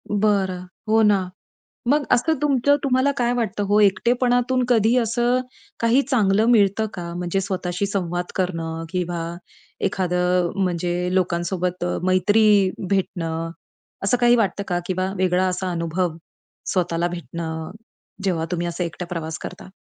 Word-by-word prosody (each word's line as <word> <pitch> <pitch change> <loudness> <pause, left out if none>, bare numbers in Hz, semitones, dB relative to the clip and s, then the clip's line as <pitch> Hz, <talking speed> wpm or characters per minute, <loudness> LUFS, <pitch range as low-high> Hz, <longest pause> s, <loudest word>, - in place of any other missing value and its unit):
बरं, 195 -3 +1 0.2
हो 220 +1 +4
ना. 200 -3 +3 0.6
मग 290 +2 +3
असं 320 +7 +3
तुमचं 285 -1 +3
तुम्हाला 265 +1 +2
काय 240 -1 +1
वाटतं 220 -4 -1
हो? 205 +1 +4
एकटेपणातून 245 +4 +2
कधी 230 0 +4
असं 240 +2 +1 0.4
काही 230 +4 +4
चांगलं 215 -5 +2
मिळतं 215 -2 +4
का? 170 -2 -6
म्हणजे 180 +2 -1
स्वतःशी 185 -1 -2
संवाद 175 -3 -2
करणं 165 -3 -2
किंवा 175 -2 -2 0.6
एखादं 180 -1 +1
म्हणजे 175 0 -1
लोकांसोबत 180 0 -1 0.2
मैत्री 200 +2 +4 0.2
भेटणं, 165 -4 -1 0.5
असं 200 +5 +2
काही 240 0 +5
वाटतं 200 -3 0
का? 175 -1 0
किंवा 185 +1 -1
वेगळा 185 0 +2
असा 185 0 -2
अनुभव 170 0 -1 0.6
स्वतःला 175 -2 0
भेटणं, 165 -2 -5 0.5
जेव्हा 175 -5 0
तुम्ही 175 -1 -1
असं 170 +1 -3
एकटं 170 +1 -5
प्रवास 160 -3 -4
करता? - - -8
185 Hz, 130 wpm, -22 LUFS, 175-220 Hz, 0.6 s, काही